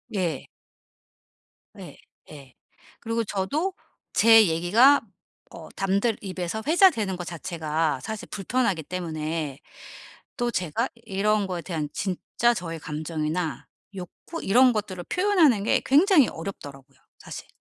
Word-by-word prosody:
예. 170 -7 -2 1.3
네. - - -11 0.3
예. 140 -4 -13 0.5
그리고 230 0 -2
저도 280 - -2 0.4
제 225 0 +7
얘기가 205 +13 +4 0.5
어 160 - -11
남들 200 +4 +1
입에서 185 +2 -4
회자되는 300 - +4
거 175 - -5
자체가 160 -3 -2
사실 215 +10 -6
불편하기 200 -3 -1
때문에 155 -4 -4 0.8
또 240 -1 0
제가 185 - -1
이런 210 -1 0
거에 180 -2 -4
대한 160 -5 -3
진짜 210 +5 0
저의 165 -4 -5
감정이나 155 +2 -3 0.3
욕구 195 - -8
이런 250 +5 +5
것들을 195 -4 -4
표현하는 350 - +3
게 250 +4 +2
굉장히 300 - +5
어렵더라고요 140 -6 -9 0.2
사실. - - -9
190 Hz, 255 characters per minute, -25 LUFS, 165-230 Hz, 1.3 s, 제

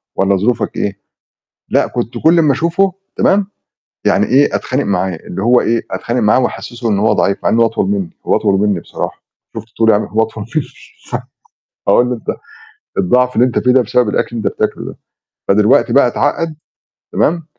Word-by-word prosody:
والّا 95 0 +2
ظروفك 115 +4 -1
إيه؟" 100 -1 -3 0.7
لأ - - +2
كنت 120 -1 -4
كلّ 165 +2 +5
أمّا 150 -4 +3
أشوفه 175 +6 +1 0.2
تمام، 195 0 +2 0.6
يعني - - +3
إيه، 140 +3 +3
أتخانق 130 +2 -2
معاه، 95 -3 -1
اللي 90 +4 -7
هو 120 +2 +4
إيه، 115 0 0
أتخانق 120 +1 -2
معاه 105 +3 +3
وأحسّسه 120 0 -3
إن 100 - +1
هو 110 +2 +2
ضعيف 100 - +1
مع - - +1
إن 115 - +2
هو 115 - +5
أطول 110 -3 -1
مني، 100 -4 -2 0.2
هو - - +3
أطول 100 -2 +1
مني 100 -4 +1
بصراحة، - - -6 0.3
شُفت 110 0 -6
طولي 110 -1 +4
عام 105 - +1
هو 110 +1 0
أطول 110 -1 -4
مني 155 -3 +1 0.5
س - - -1 0.7
أقول 125 0 +4
له: 125 - -1
"أنت 115 - -9 0.7
الضعف 125 +7 +2
اللي 120 - +5
أنت 125 - -1
فيه 125 - +2
ده 130 - +4
بسبب 120 0 +1
الأكل 120 +3 -1
بتاكله - - -2
ده." - - -8 0.5
فدلوقتي 105 +4 +3
بقى 140 - +5
اتعقد، 160 +6 -1 0.6
تمام، 165 0 +1
115 Hz, 185 wpm, -15 LUFS, 105-130 Hz, 0.7 s, كلّ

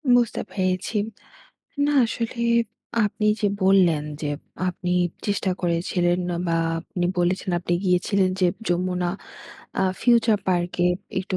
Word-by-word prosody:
বুঝতে 240 -2 +2
পেরেছি। 185 +2 -1 0.9
না 295 - +1
আসলে 235 +1 -3 0.6
আপনি 210 +1 -1
যে 210 - +3 0.2
বললেন 180 -6 +4 0.2
যে, 150 - -1 0.4
আপনি 180 0 -3 0.3
চেষ্টা 200 -2 0
করেছিলেন 175 +1 +1 0.3
বা 165 0 +2 0.2
আপনি 175 +1 -3
বলেছেন 180 +2 0
আপনি 175 0 -1
গিয়েছিলেন 185 +1 +2
যে, 185 - +4 0.2
যমুনা 180 0 0 0.7
আ - - +3 0.2
ফিউচার 230 -3 +4
পার্কে 175 -1 +1 0.3
একটু 185 0 -2
185 Hz, 115 wpm, -24 LUFS, 175-200 Hz, 0.9 s, বললেন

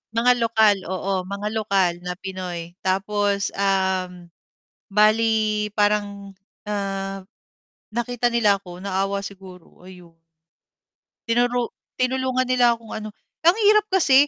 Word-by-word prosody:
Mga 245 +1 +4
lokal, 220 -3 +4
oo 190 0 -2
mga 200 +2 -4
lokal 195 -5 +1
na 180 0 -5
Pinoy 180 -2 -6
tapos, 200 +1 0
um, 190 -3 -1 0.6
bali 215 0 +2
parang, 205 -1 0 0.3
ah, 195 -1 -3 0.7
nakita 240 0 0
nila 210 -4 +4
ako 180 -2 -11
naawa 195 +1 -1
siguro 185 -2 -12
ayon. 180 -3 -14 1.1
Tinuro 240 +1 +1 0.2
tinulungan 255 0 0
nila 245 -2 +3
kung 225 -1 -11
ano 215 0 -5 0.4
ang 350 - +7
hirap 425 +1 +5
kasi, 290 -8 +5
205 Hz, 110 wpm, -23 LUFS, 190-230 Hz, 1.1 s, ang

